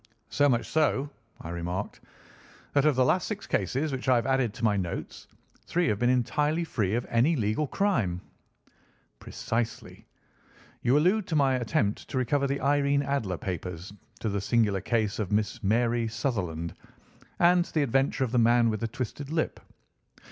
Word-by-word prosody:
"So 145 0 +3
much 120 -3 +1
so," 150 -2 +1 0.3
I - - -7
remarked, 90 +3 -4 0.7
"that 145 0 +3
of 150 -3 +4
the 130 0 +3
last 180 +7 +2
six 215 -1 -5
cases 135 - -1
which 130 -1 -3
I 130 - +6
have 120 -1 +1
added 130 -4 +1
to 120 - -8
my 105 -2 +3
notes, 90 -4 -5 0.4
three 175 0 +1
have 105 - 0
been 120 - +2
entirely 150 +6 +1
free 110 - -1
of 120 - -1
any 125 +8 +2
legal 110 +4 0
crime." 125 - 0 1.0
"Precisely. 115 0 -4 0.7
You 125 +4 +3
allude 185 +6 +2
to 160 - -2
my 140 -3 +3
attempt 115 -4 -1
to - - -4
recover 140 +3 +1
the 140 +1 -2
Irene 140 +1 +2
Adler 115 -11 -1
papers, 90 +1 -5 0.3
to 110 - -1
the 100 -1 -2
singular 105 -3 +1
case 110 0 0
of 105 -3 -2
Miss 105 +2 0
Mary 115 +3 +1
Sutherland, 90 - -3 0.6
and 175 0 +5
to - - -13
the 155 - +1
adventure 135 +1 +1
of 125 - -2
the 125 - +2
man 120 0 +4
with 110 - -3
the 115 - -2
twisted 130 +4 -5
lip. 160 0 -1
120 Hz, 170 wpm, -28 LUFS, 105-145 Hz, 1.0 s, I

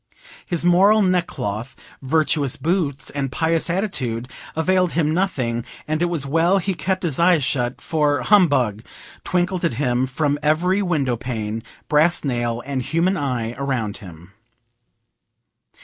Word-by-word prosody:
His 175 -1 -1
moral 200 +5 +5
neck 180 -2 +2
cloth, 110 +6 -5 0.3
virtuous 145 -1 +1
boots, 155 -6 -1
and 140 -2 -3
pious 165 +4 0
attitude 130 - -2 0.3
availed 180 +2 +1
him 155 -1 +1
nothing, 130 -11 -1 0.2
and 155 +1 -1
it - - +3
was 170 -5 -1
well 165 +7 +2
he 195 +1 -1
kept 185 +2 -2
his 160 -5 -1
eyes 170 -3 +4
shut, 125 -1 -1
for 150 -3 0
"Humbug!" 140 - +3 0.4
twinkled 180 0 -1
at 165 -9 0
him 125 -1 0
from 145 +2 -1
every 175 +6 +2
window 145 -10 0
pane, 115 -3 -4 0.3
brass 155 +3 +3
nail 120 -3 -2
and 135 -1 -2
human 170 +8 +1
eye 125 -7 -2
around 125 -7 -2
him. 90 -1 -13
150 Hz, 140 wpm, -21 LUFS, 125-175 Hz, 0.4 s, moral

